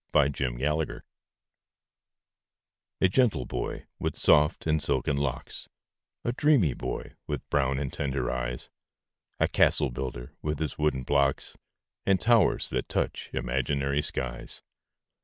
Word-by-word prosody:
THE 75 -1 +5
CASTLE 65 -3 -2
BUILDER 75 +4 -1 2.0
A - - +6
gentle 120 +3 +2
boy, - - -4
with - - -2
soft 75 +2 +4
and 80 -1 +2
silken 75 -1 0
locks 70 -3 -3 0.5
A 120 - 0
dreamy 125 - +3
boy, - - -5
with 75 -4 -4
brown 65 -2 +2
and 70 -1 -3
tender 70 -1 -1
eyes, 60 0 -4 0.7
A - - +4
castle - - +3
builder, 60 -1 -5
with 75 0 -2
his 75 -1 -3
wooden 75 -4 +1
blocks, 70 +1 +1 0.5
And 95 -1 +3
towers 115 -4 +3
that - - -2
touch - - -2
imaginary 70 +3 0
skies. 65 -3 -5
70 Hz, 125 wpm, -28 LUFS, 65-80 Hz, 2.0 s, A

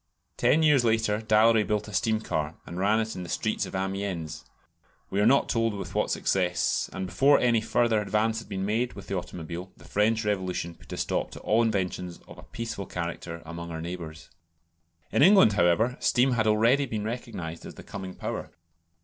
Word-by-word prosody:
Ten 160 +2 +3
years 145 -5 +5
later 110 -2 +1
Dallery 110 0 +4
built 105 0 -1
a 105 - -9
steam 110 +2 +1
car, 80 -6 -2
and 85 - -7
ran 105 +3 +3
it 110 0 -2
in 90 - -5
the 90 - -7
streets - - -1
of - - -8
Amiens 95 -5 -3 0.7
we 100 - +1
are 105 - +4
not 140 +3 +4
told 115 -2 0
with 100 - -6
what - - 0
success; 90 -2 0
and 95 - -4
before 140 +9 +4
any 120 -2 +3
further 115 -1 +2
advance 110 +2 0
had 115 - -12
been 95 0 -3
made 115 +3 0
with 100 +1 -10
the 100 - -3
automobile 90 0 -6
the - - -16
French 110 +2 +1
Revolution 95 -4 -2
put - - -17
a - - -4
stop - - -1
to - - -10
all 110 +2 +2
inventions 90 -5 -1
of - - -12
a - - -9
peaceful 115 -4 -6
character 85 -1 -5
among 85 +1 -7
our 80 -1 -5
neighbours. 85 -1 -7 0.8
In - - +2
England, 190 - +7
however, 105 +7 +2
steam 130 +2 +3
had 110 -3 +1
already 115 +6 +3
been 110 -3 -3
recognised 110 -8 -5
as - - -10
the - - -11
coming 95 -2 -7
power. - - -5
105 Hz, 195 wpm, -27 LUFS, 90-115 Hz, 0.8 s, England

